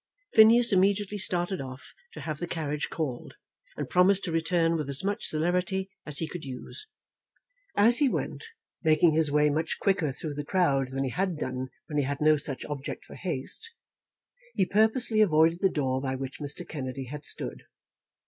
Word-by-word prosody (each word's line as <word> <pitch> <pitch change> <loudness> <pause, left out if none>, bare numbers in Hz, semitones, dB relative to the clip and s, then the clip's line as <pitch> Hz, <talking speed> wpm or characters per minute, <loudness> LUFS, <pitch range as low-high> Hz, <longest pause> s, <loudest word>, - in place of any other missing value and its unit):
Phineas 230 +1 +7
immediately 200 +2 +2
started 180 -1 -1
off 130 0 -9 0.2
to - - -8
have 155 -2 -4
the 175 - -3
carriage 150 -3 -3
called, 140 -7 -4 0.4
and - - -3
promised 185 +2 +3
to 175 - -3
return 165 0 +1
with 150 -3 -3
as 140 +3 -2
much 205 +3 -1
celerity 180 +4 0 0.2
as 150 -2 -2
he 160 - 0
could 175 0 -7
use. 135 - -7 0.9
As 230 +5 +7
he 285 -3 +4
went, - - -3 0.4
making 160 0 +4
his 160 -1 +3
way 150 0 +3
much 160 +2 -1
quicker 180 -7 +1
through 150 +3 -5
the 145 +1 -4
crowd 145 -6 +1
than 135 +1 -3
he 130 - -2
had 185 0 -1
done 130 -2 -4 0.2
when 150 -2 -2
he - - +2
had 140 +1 -3
no 155 0 +5
such 140 -2 -3
object 145 -2 -6
for - - -13
haste, 180 - -3 0.9
he 190 - +3
purposely 220 +2 +2
avoided 165 -3 +4
the 195 - +4
door 130 -5 -1
by 130 -1 -2
which 135 0 -6
Mr. 145 -1 -5
Kennedy 135 -3 -5
had 145 +4 -8
stood. - - -2
160 Hz, 180 wpm, -28 LUFS, 140-190 Hz, 0.9 s, Phineas